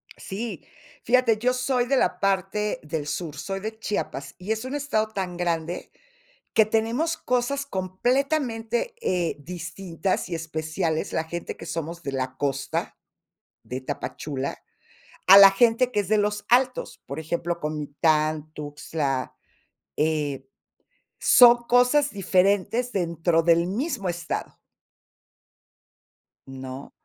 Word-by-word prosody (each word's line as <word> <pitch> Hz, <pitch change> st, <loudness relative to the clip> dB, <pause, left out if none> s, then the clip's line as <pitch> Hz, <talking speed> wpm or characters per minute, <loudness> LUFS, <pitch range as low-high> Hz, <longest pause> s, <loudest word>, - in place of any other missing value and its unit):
Sí, 195 Hz, -6 st, -6 dB, 0.4 s
fíjate, 240 Hz, -2 st, +3 dB
yo 250 Hz, +3 st, +1 dB
soy 255 Hz, -1 st, +1 dB
de 275 Hz, -, +2 dB
la -, -, +1 dB
parte 195 Hz, +2 st, 0 dB
del 150 Hz, -1 st, -4 dB
sur, 155 Hz, 0 st, -4 dB
soy 195 Hz, 0 st, -4 dB
de 220 Hz, +2 st, -6 dB
Chiapas, 140 Hz, -10 st, -4 dB
y 190 Hz, +4 st, -5 dB
es 220 Hz, +1 st, -1 dB
un 260 Hz, -, -5 dB
estado 245 Hz, -7 st, 0 dB
tan 185 Hz, -4 st, -4 dB
grande 170 Hz, -1 st, -2 dB, 0.6 s
que 220 Hz, -, +6 dB
tenemos 230 Hz, +10 st, 0 dB
cosas 250 Hz, +3 st, -1 dB
completamente, 240 Hz, -, -1 dB
eh, 175 Hz, -2 st, 0 dB
distintas 175 Hz, +3 st, -3 dB
y 170 Hz, -, -2 dB
especiales, 160 Hz, 0 st, -2 dB
la 160 Hz, -, 0 dB
gente 170 Hz, +1 st, -6 dB
que -, -, -9 dB
somos 170 Hz, +1 st, -5 dB
de 140 Hz, -, -3 dB
la 130 Hz, -1 st, -2 dB
costa 140 Hz, -1 st, -2 dB, 0.7 s
de 130 Hz, +1 st, -5 dB
Tapachula, 130 Hz, +2 st, -4 dB, 0.7 s
a 190 Hz, -, +10 dB
la 195 Hz, -1 st, +11 dB
gente 235 Hz, +4 st, +3 dB
que 210 Hz, -, +2 dB
es 200 Hz, -, -4 dB
de 215 Hz, 0 st, +3 dB
los 210 Hz, 0 st, 0 dB
altos, 255 Hz, +1 st, +2 dB
por 140 Hz, +3 st, -5 dB
ejemplo, 170 Hz, +2 st, -2 dB
Comitán, 155 Hz, +1 st, 0 dB
Tuxtla, 145 Hz, -2 st, -3 dB, 0.6 s
eh, 150 Hz, -3 st, -1 dB, 0.7 s
son 240 Hz, -1 st, +7 dB
cosas 250 Hz, +4 st, +4 dB
diferentes 200 Hz, +5 st, +1 dB
dentro 170 Hz, -3 st, +1 dB
del 170 Hz, 0 st, +4 dB
mismo 225 Hz, -, -2 dB
estado. 175 Hz, 0 st, -4 dB, 1.9 s
No. 130 Hz, 0 st, -8 dB
185 Hz, 125 wpm, -25 LUFS, 155-225 Hz, 1.9 s, la